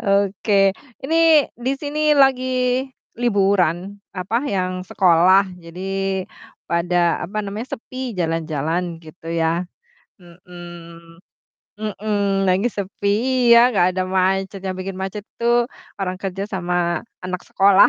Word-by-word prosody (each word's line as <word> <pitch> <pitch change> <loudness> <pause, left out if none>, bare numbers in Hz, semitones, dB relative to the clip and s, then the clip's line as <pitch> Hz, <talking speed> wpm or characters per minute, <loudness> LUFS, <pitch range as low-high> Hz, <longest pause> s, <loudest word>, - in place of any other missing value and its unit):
Oke, 200 0 +2 0.3
ini 325 -1 +5
di 250 +3 -2
sini 300 +1 +1
lagi 255 -2 +3 0.4
liburan 195 -3 +1 0.2
apa, 185 +5 -2
yang 185 -2 -1
sekolah, 185 +1 +4
jadi 190 +2 -3 0.4
pada, 170 0 +1
apa 195 +5 -6
namanya, 210 +5 -5
sepi 255 -1 -7
jalan-jalan 165 0 -1
gitu 160 +1 -12
ya. 165 0 +1 0.6
Mhm, 175 -1 -13 0.6
mhm, 205 -2 -1
lagi 190 +5 +2
sepi, 200 -1 -4 0.5
iya, 245 +1 +6
gak 185 -2 +2
ada 185 - +1
macet, 190 +1 0
yang 185 -1 -4
bikin 185 0 -5
macet 195 +2 -4 0.2
tuh 240 0 +3 0.3
orang 185 -2 -3
kerja 195 0 -3
sama 175 -3 -1 0.2
anak 185 0 -3
sekolah. 195 0 +6
190 Hz, 115 wpm, -21 LUFS, 175-210 Hz, 0.6 s, iya